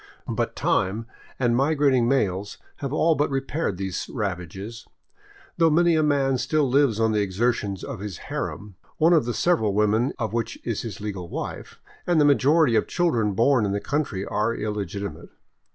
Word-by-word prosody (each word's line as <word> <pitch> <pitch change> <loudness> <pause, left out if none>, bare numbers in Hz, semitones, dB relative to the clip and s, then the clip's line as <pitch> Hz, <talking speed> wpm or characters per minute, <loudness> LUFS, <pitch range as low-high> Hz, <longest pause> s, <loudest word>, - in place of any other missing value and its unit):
But - - -2
time 100 +4 0 0.3
and 120 -2 +2
migrating 135 -3 +3
males 100 -7 0 0.2
have 140 -2 -4
all 160 +2 +3
but 145 -1 0
repaired 135 - -2
these 95 -1 -4
ravages, 100 +1 -5 0.7
though 165 -1 +5
many 170 +2 +4
a 155 - +3
man 140 -3 +2
still 155 0 +1
lives 130 -4 +2
on 110 0 +2
the 105 -1 +1
exertions 100 0 -1
of - - -6
his 100 -3 -6
harem, 100 -3 -6 0.2
one 165 +3 +4
of 155 -7 +4
the 120 - -2
several 110 - +1
women 105 +5 +2
of 110 -4 -2
vs^hich 115 0 -2
is 115 -4 -2
his 105 -5 -7
legal 95 -5 -5
wife, - - -6 0.3
and 175 -3 +3
the 150 - +5
majority 145 -1 +4
of 110 - +2
children 120 - +1
born 120 +4 +3
in 100 -1 0
the 100 - 0
country 125 -8 -2
are 105 +3 0
illegitimate. 100 -2 -4
115 Hz, 170 wpm, -24 LUFS, 100-145 Hz, 0.7 s, though